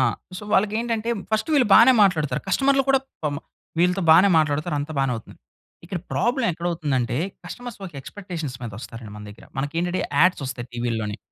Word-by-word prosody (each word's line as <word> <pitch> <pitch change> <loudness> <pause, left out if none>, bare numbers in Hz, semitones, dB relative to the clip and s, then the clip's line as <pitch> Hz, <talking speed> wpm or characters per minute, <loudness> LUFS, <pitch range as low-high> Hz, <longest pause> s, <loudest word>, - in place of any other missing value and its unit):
ఆ! - - +4 0.4
So, - - -10
వాళ్ళకెంటంటే, 225 +2 +1 0.2
first 220 +9 +1
వీళ్ళు 275 -5 +4
బానే 235 +3 +8
మాట్లాడుతారు, 155 -9 +2
కస్టమర్‌లు 270 +7 +3
కూడా 270 0 +5 0.2
పాపం 145 -2 -1 0.4
వీళ్ళతో 180 +2 +2
బానే 175 +5 +7
మాట్లాడుతారు, 150 +1 0
అంతా 150 +2 -5
బానే 135 -2 +1
అవుతుంది. 110 - -12 0.5
ఇక్కడ 180 +1 -4
ప్రాబ్లమ్ 240 -1 +1
ఎక్కడ 170 +2 -5
అవుతుందంటే, 135 -7 -1 0.3
కస్టమర్స్ 240 +6 -8
ఒక 175 - -11
ఎక్స్‌పెక్టేషన్స్ 165 -5 -6
మీద 115 - -5
వస్తారండి 115 -3 -9
మన 105 - -9
దగ్గర. 105 - -15
మనకేంటంటే, 165 +6 -1 0.2
యాడ్స్ 180 -4 +4
ఓస్తాయి 125 -1 -6
టీవీల్లోని, 115 -3 -2
170 Hz, 165 wpm, -23 LUFS, 130-210 Hz, 0.5 s, బానే